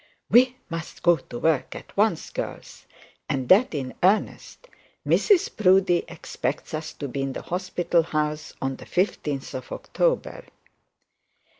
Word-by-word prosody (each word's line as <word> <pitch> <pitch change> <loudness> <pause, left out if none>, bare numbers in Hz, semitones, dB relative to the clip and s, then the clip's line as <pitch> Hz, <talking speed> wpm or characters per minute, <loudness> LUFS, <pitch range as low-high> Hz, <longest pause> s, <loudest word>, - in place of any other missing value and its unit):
'We 255 +1 +6
must 165 -1 -7
go 175 -1 +5
to 120 - -9
work 160 0 0
at - - -11
once, - - +1
girls; - - -7 0.4
and 130 -2 -1
that 200 -1 +5
in 130 -3 -4
earnest. 205 - 0 0.4
Mrs 400 -5 +3
Proudie 185 -3 +4
expects 160 -4 -4
us 155 0 -4
to 145 - -6
be 135 +1 -4
in 135 0 -2
the - - -6
hospital 175 -1 0
house 150 -2 -2
on 135 0 -2
the - - -12
15th 150 -7 -1
of 130 - -7
October.' - - -1
165 Hz, 140 wpm, -25 LUFS, 140-185 Hz, 0.4 s, We